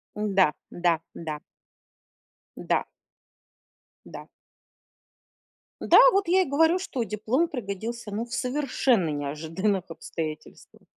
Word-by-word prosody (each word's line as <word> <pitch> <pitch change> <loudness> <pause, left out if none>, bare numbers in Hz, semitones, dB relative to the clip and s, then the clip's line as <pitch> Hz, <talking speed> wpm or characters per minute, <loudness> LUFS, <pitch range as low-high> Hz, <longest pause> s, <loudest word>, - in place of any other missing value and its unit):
Да, 195 -6 +2 0.2
да, 170 -2 +1 0.2
да. 155 -3 -5 1.2
Да. - - -1 1.2
Да. - - -10 1.5
Да. - - +6
Вот 395 -2 +1
я 375 +2 +4
и - - +1
говорю, 320 +5 +3
что 270 -10 -3
диплом 225 - 0
пригодился, 230 - -5
ну, 215 +3 -3
в 240 - -11
совершенно 250 - +1
неожиданных 160 +7 -2
обстоятельствах. 160 -1 -7
210 Hz, 100 wpm, -26 LUFS, 165-265 Hz, 1.5 s, Да